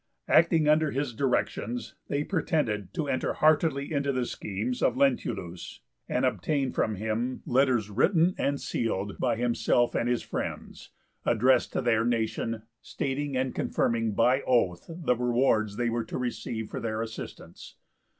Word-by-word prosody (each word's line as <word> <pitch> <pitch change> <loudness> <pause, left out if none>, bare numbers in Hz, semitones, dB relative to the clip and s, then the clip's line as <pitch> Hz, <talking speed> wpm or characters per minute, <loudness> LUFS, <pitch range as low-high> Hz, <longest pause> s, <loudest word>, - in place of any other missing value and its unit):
Acting 160 -1 +4
under 155 0 +4
his 135 -2 -2
directions 125 -2 -1
they 145 +1 -1
pretended 130 - -1
to 155 - -1
enter 130 - 0
heartily 155 -1 +2
into 140 -1 +1
the 130 -2 -1
schemes 110 +3 -4
of 125 - +2
Lentulus, 90 -10 -1 0.3
and 125 - +1
obtained 130 - 0
from 110 - 0
him 110 +5 -2
letters 125 -5 +2
written 165 - +3
and 140 0 -1
sealed 100 -3 -2
by 120 -3 +1
himself 120 0 +1
and 120 - 0
his 120 -1 0
friends, - - -5 0.3
addressed 130 +1 +3
to - - -1
their 115 -2 +3
nation, 115 -1 -1 0.2
stating 140 0 -3
and 130 0 -1
confirming 115 -2 0
by 125 +5 +3
oath 90 -9 +1
the 165 -6 0
rewards 120 -4 +1
they 120 -1 0
were 115 -1 -1
to - - -5
receive 110 -2 -4
for - - -4
their 110 0 -2
assistance. 110 -1 -9
125 Hz, 150 wpm, -28 LUFS, 110-140 Hz, 0.3 s, Acting